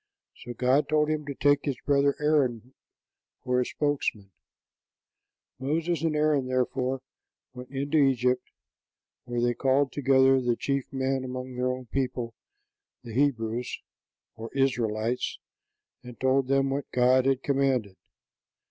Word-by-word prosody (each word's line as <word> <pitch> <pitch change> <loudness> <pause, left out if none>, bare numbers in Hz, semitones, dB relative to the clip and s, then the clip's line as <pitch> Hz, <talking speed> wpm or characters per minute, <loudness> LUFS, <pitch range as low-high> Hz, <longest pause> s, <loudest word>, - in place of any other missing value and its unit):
So 120 - -8
God 130 +5 +2
told 150 0 +2
him 150 -1 -3
to 140 - -4
take 145 +1 +3
his 135 -5 -2
brother 140 -1 +3
Aaron 130 -5 +1 0.7
for 125 0 +1
a - - 0
spokesman. 135 -9 -2 1.3
Moses 160 +4 -1
and 160 -2 0
Aaron, 150 -3 +2
therefore, 130 0 -1 0.5
went 125 0 -10
into 140 +3 0
Egypt, 125 -2 +2 0.8
where 120 0 -3
they 120 0 +2
called 135 +2 +1
together 135 -1 +4
the 120 -1 +1
chief 140 +2 -2
men 135 0 -1
among 130 0 -6
their 125 +1 -1
own 125 0 -4
people, 125 -2 -3 0.7
the 115 -2 -9
Hebrews, 120 -3 0 0.6
or 115 +1 -7
Israelites, 120 -3 0 0.6
and 125 -2 -12
told 130 0 +2
them 135 0 +2
what 140 0 -3
God 125 +1 +3
had 135 -1 +1
commanded. 135 -8 0
130 Hz, 130 wpm, -27 LUFS, 125-140 Hz, 1.3 s, together